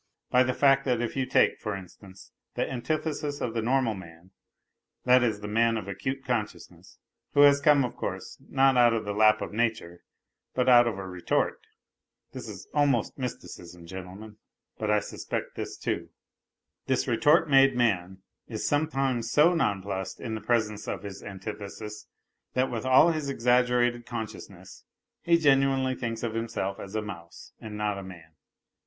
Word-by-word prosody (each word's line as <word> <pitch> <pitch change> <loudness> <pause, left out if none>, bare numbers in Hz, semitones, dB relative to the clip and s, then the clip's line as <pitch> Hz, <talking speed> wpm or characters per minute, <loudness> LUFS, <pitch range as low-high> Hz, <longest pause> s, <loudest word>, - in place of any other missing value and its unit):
by 125 - +5
the 130 0 +2
fact 135 +1 +3
that 125 -3 0
if 120 -1 -3
you 130 -1 -1
take, - - +3
for 105 -3 -3
instance, 95 +1 -13 0.2
the - - -1
antithesis 145 +2 -3
of 115 - -3
the 115 - -1
normal 125 0 +1
man, 90 -1 -12 0.7
that 125 0 +6
is, 110 -4 0
the 105 - -5
man 115 +2 +2
of 105 - -6
acute 130 +7 -4
consciousness, 115 -4 -5 0.4
who 145 - +6
has 140 0 +6
come, 145 -2 +5
of 120 - -6
course, - - -6
not 135 0 +3
out 120 -1 +5
of 110 - -3
the 105 - -3
lap 110 +1 +4
of - - -7
nature 110 -7 -2 0.5
but 125 0 +1
out 120 -1 +7
of 110 -4 -2
a 95 - -6
retort 90 -1 -1 0.7
(this - - -8
is - - -9
almost 140 -6 +1
mysticism, 90 -8 -7
gentlemen, 95 +4 -9 0.4
but 110 - -2
I 105 0 +3
'suspect - - -5
this, - - -6
too), - - -3 0.8
this 130 0 0
retort 150 +7 +4
made 135 -2 +5
man 95 -6 0 0.2
is - - -4
sometimes 135 -6 0
so 155 +7 +5
nonplussed 100 - -2
in 115 - -5
the 110 - -4
presence 110 -3 -1
of 95 - -4
his 100 -1 -8
antithesis 105 +2 -8 0.5
with 130 -2 -1
all 130 +6 +6
his 155 -3 -3
exaggerated 120 -1 +2
consciousness 100 -5 -8 0.4
he 170 -1 +3
genuinely 135 -3 +3
thinks 115 -3 -4
of 115 -2 -2
himself 115 -4 -3
as 100 +2 -8
a 110 - -1
mouse 85 -5 -10
and 105 -1 -7
not 105 -1 -1
a - - -8
man. 85 -4 -12
115 Hz, 165 wpm, -27 LUFS, 100-130 Hz, 0.8 s, out